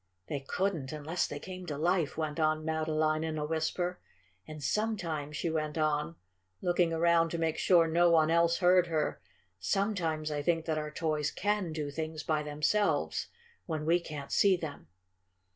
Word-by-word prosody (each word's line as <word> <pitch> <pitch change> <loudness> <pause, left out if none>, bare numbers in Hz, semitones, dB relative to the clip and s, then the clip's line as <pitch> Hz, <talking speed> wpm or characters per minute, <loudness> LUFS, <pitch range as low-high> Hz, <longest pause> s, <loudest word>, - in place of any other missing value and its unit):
"They 145 - -2
couldn't, 155 0 -2
unless 155 +3 -2
they 145 - -5
came 185 +3 -8
to 145 - -3
life," 170 -1 +1
went 155 0 -2
on 155 0 +1
Madeline 155 0 0
in 160 -1 -2
a 150 - -1
whisper. 165 +3 -1 0.5
"And 155 -1 -8
sometimes," 165 -4 -1
she 170 - -1
went 155 -1 -2
on, 155 +1 0 0.4
looking 175 -1 +2
around 165 0 +3
to 170 - -3
make 165 -1 -1
sure 170 -3 +5
no 170 +2 +4
one 160 -1 +4
else 170 0 +3
heard 180 -1 +4
her, 160 -2 -1 0.4
"sometimes 170 -7 -1
I 145 -1 -1
think 165 +1 +1
that 155 -2 0
our 150 0 -4
toys 155 -1 -1
CAN 205 -4 -1
do 150 -2 -3
things 155 +1 -4
by 155 -1 0
themselves 150 +8 0 0.4
when 155 -3 -3
we 170 +2 +4
can't 150 -4 -7
see 195 -2 +4
them." 155 - -7
160 Hz, 170 wpm, -31 LUFS, 155-175 Hz, 0.5 s, sure